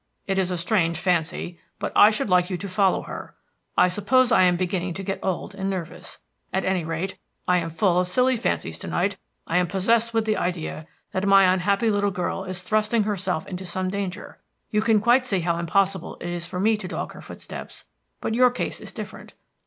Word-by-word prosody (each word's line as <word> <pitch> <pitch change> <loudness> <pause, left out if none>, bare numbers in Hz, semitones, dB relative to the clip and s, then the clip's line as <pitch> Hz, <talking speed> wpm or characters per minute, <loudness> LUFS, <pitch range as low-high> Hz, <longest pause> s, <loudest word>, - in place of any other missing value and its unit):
"It 195 -1 0
is 185 -1 +1
a 180 - -2
strange 170 -2 +1
fancy, 170 0 -1 0.2
but - - -3
I 210 - +8
should 215 0 -1
like 180 -1 +3
you 185 - -2
to 200 +3 -6
follow 190 0 +2
her. - - -8 0.4
I - - +6
suppose 235 +7 +2
I 225 - +6
am 180 -1 +4
beginning 180 -1 -2
to 195 - -5
get 195 0 -3
old 190 +1 -2
and 195 0 -3
nervous; 180 -4 -6 0.3
at 190 - -1
any 185 -2 +1
rate, 165 +4 -4 0.3
I 180 0 +4
am 165 -1 -3
full 180 +1 +2
of 180 - +1
silly 255 +7 +3
fancies 235 - -2
tonight. - - -1 0.3
I - - 0
am 180 - +1
possessed 225 +6 +2
with 225 -1 +1
the 215 -1 +1
idea 165 -3 -3 0.2
that 190 +1 -1
my 195 -2 +6
unhappy 200 +4 +1
little 205 0 +1
girl 185 0 -3
is 185 -1 -5
thrusting 215 +2 +2
herself 190 -5 -2
into 185 0 -6
some 185 +1 -2
danger. 200 0 -5 0.3
You 210 - +2
can 220 -1 +4
quite 245 +4 +4
see 195 -6 +1
how 170 0 0
impossible 190 +1 0
it 175 - -5
is 175 -1 -4
for 180 - -5
me 215 +3 +3
to 190 - -6
dog - - -4
her - - -11
footsteps, - - -9 0.4
but - - -2
your 250 +2 +5
case 245 - -4
is - - -8
different. - - -9
190 Hz, 210 wpm, -24 LUFS, 180-210 Hz, 0.4 s, I